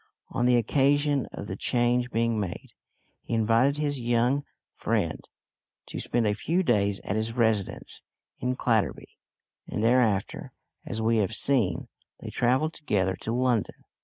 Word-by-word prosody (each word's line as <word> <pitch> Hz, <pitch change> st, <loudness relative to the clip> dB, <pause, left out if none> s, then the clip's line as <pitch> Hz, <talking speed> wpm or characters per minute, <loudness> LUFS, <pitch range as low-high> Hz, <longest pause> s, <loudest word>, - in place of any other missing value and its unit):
On 125 Hz, -1 st, 0 dB
the 125 Hz, -, +5 dB
occasion 140 Hz, +3 st, +2 dB
of -, -, -7 dB
the -, -, -5 dB
change 120 Hz, 0 st, +1 dB
being 115 Hz, -1 st, 0 dB
made, 95 Hz, -4 st, -5 dB, 0.5 s
he 115 Hz, -, -3 dB
invited 115 Hz, +6 st, +3 dB
his 145 Hz, -2 st, -1 dB
young 120 Hz, +4 st, +1 dB, 0.3 s
friend -, -, -1 dB, 0.6 s
to -, -, -6 dB
spend 120 Hz, -2 st, 0 dB
a 105 Hz, -, +2 dB
few 170 Hz, -, 0 dB
days 100 Hz, -, +1 dB
at 95 Hz, -, -3 dB
his 110 Hz, +1 st, -2 dB
residence 110 Hz, -5 st, -1 dB, 0.4 s
in 125 Hz, +1 st, -1 dB
Clatterby, 115 Hz, -4 st, -1 dB, 0.5 s
and 105 Hz, -, -3 dB
thereafter, 115 Hz, -4 st, +1 dB, 0.3 s
as 110 Hz, +1 st, -3 dB
we 115 Hz, +1 st, +3 dB
have 110 Hz, +1 st, 0 dB
seen, 110 Hz, -12 st, +1 dB, 0.3 s
they -, -, -7 dB
travelled 130 Hz, +6 st, +1 dB
together 95 Hz, -, 0 dB
to 110 Hz, -, -5 dB
London. 125 Hz, -2 st, +1 dB
120 Hz, 145 wpm, -27 LUFS, 110-130 Hz, 0.6 s, the